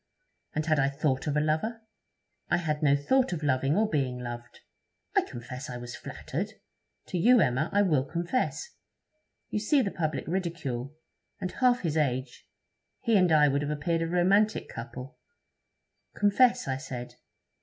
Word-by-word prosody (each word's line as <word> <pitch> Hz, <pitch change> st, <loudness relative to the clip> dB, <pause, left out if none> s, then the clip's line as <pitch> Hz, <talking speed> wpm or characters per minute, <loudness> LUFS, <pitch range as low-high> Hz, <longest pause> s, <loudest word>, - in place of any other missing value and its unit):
And 155 Hz, 0 st, 0 dB
had 155 Hz, -2 st, +2 dB
I 135 Hz, 0 st, +3 dB
thought 140 Hz, 0 st, -1 dB
of 150 Hz, 0 st, 0 dB
a -, -, +4 dB
lover!... 160 Hz, +10 st, -1 dB, 0.7 s
I 175 Hz, -, +3 dB
had 155 Hz, -3 st, -2 dB
no 140 Hz, -2 st, +4 dB
thought 255 Hz, -, +2 dB
of 160 Hz, -3 st, -4 dB
loving 135 Hz, +2 st, +2 dB
or 220 Hz, +1 st, +3 dB
being 135 Hz, -8 st, -1 dB
loved. 120 Hz, -1 st, -8 dB, 0.5 s
I -, -, +6 dB
confess 125 Hz, +4 st, -8 dB
I 125 Hz, -, -5 dB
was 120 Hz, 0 st, -7 dB
flattered. -, -, -5 dB, 0.6 s
To 180 Hz, -, -1 dB
you, 245 Hz, +6 st, +6 dB
Emma, 135 Hz, -2 st, +2 dB
I 205 Hz, 0 st, +4 dB
will 155 Hz, -9 st, +2 dB
confess.... 175 Hz, -, -2 dB, 0.8 s
You 210 Hz, -, 0 dB
see 265 Hz, +6 st, +3 dB
the 200 Hz, -, -2 dB
public 155 Hz, -4 st, -2 dB
ridicule! 155 Hz, -7 st, -3 dB, 0.4 s
and 180 Hz, -, -3 dB
half 250 Hz, -1 st, +2 dB
his 160 Hz, -3 st, -1 dB
age, 130 Hz, -3 st, -2 dB, 0.5 s
he 230 Hz, -, +2 dB
and 185 Hz, -4 st, +4 dB
I 150 Hz, -1 st, +6 dB
would 140 Hz, 0 st, +1 dB
have 145 Hz, -, -2 dB
appeared 150 Hz, +3 st, -1 dB
a 165 Hz, -, 0 dB
romantic 195 Hz, +5 st, +2 dB
couple! 125 Hz, +5 st, -8 dB, 1.0 s
Confess, 205 Hz, -, +3 dB
I 130 Hz, -1 st, -1 dB
said. 125 Hz, -3 st, -7 dB
155 Hz, 165 wpm, -28 LUFS, 135-185 Hz, 1.0 s, I